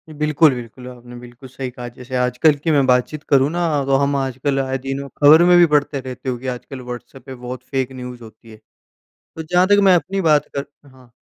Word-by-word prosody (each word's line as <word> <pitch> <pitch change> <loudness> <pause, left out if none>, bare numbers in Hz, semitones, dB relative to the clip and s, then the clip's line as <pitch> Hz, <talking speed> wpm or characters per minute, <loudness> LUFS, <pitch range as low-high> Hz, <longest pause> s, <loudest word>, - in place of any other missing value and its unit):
बिल्कुल, 150 0 +3
बिल्कुल 125 +1 -10
आपने 120 -1 -12
बिल्कुल 120 +1 -13
सही 130 0 -6
कहा 120 0 -8
जैसे 130 +1 -8
आजकल 125 +5 +2
की 165 - +1
मैं 140 -3 +3
बातचीत 130 +4 +1
करूँ 135 0 +4
ना 175 - -3 0.3
तो 135 0 +2
हम 140 0 0
आजकल 135 +1 -2
आए 135 0 -2
दिनों 135 +1 -5
खबर 155 +4 +7
में 175 0 +6
भी 175 - +7
पढ़ते 145 -1 +1
रहते 130 0 -7
हो 125 - -3
कि 130 +2 -9
आजकल 130 +1 -6
व्हाट्सएप 125 +1 -10
पे 130 - -9
बहुत 125 0 -8
फेक 135 -1 -3
न्यूज़ 125 -2 -9
होती 110 +1 -15
है। 110 - -13 0.8
तो 160 - -5
जहाँ 180 +3 +2
तक 205 - +4
मैं 190 -2 +6
अपनी 195 +3 -2
बात 155 -4 +2
कर 140 - -2 0.2
हाँ, 130 -3 -20
135 Hz, 220 wpm, -19 LUFS, 125-145 Hz, 0.8 s, खबर